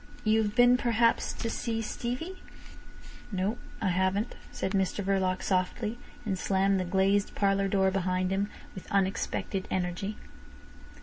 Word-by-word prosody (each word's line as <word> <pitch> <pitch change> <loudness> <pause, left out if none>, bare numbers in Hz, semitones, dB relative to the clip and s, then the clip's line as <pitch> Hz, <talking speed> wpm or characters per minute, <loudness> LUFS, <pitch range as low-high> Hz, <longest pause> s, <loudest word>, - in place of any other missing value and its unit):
You've 215 -1 +2
been 245 0 +6
perhaps 230 -1 +2
to - - -4
see 225 0 -2
Stevie?" 250 - -4 0.9
"No! 195 +4 -1 0.2
I - - +3
haven't," 190 +5 +1 0.2
said 190 - -2
Mr 195 0 0
Verloc 190 -1 +1
softly, 210 +5 0 0.3
and 195 -3 -1
slammed 195 0 +2
the 185 - -1
glazed 195 +2 +2
parlour 195 -1 +2
door 190 -1 +3
behind 185 -1 0
him 200 +2 0 0.2
with 185 - -10
unexpected 195 0 0
energy. 185 +3 -2
195 Hz, 130 wpm, -29 LUFS, 190-215 Hz, 0.9 s, been